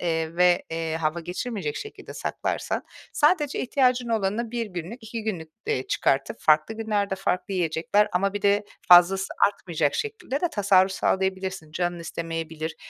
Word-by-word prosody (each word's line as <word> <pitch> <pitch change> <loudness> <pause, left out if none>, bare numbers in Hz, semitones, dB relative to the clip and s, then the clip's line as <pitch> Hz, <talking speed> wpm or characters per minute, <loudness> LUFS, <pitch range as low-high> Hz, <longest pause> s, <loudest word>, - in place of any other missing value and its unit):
eee, 165 -1 -1
ve, 180 0 +4
eee, 165 -1 -2
hava 165 +1 -1
geçirmeyecek 180 -1 -4
şekilde 430 - -8
saklarsan - - -2 0.3
sadece 300 -1 +2
ihtiyacın 250 -2 +2
olanı 220 +1 -1
1 235 -1 -2
günlük, 185 +5 -7
2 225 0 -5
günlük, 180 -7 -4 0.2
eee, 130 - -1
çıkartıp 135 0 0
farklı 155 +8 +3
günlerde, 210 -3 -1
farklı 190 0 -2
yiyecekler 175 +4 +1
ama 195 +2 +1
bir 205 0 -4
de 205 +1 +3 0.2
fazlası 180 +2 +7 0.2
artmayacak 165 -7 -1
şekilde 435 - -3
de 350 - +1
tasarruf 195 -2 +4
sağlayabilirsin. 190 -4 -1
Canın 175 +1 -1
istemeyebilir 165 -1 -5
190 Hz, 145 wpm, -25 LUFS, 165-220 Hz, 0.3 s, fazlası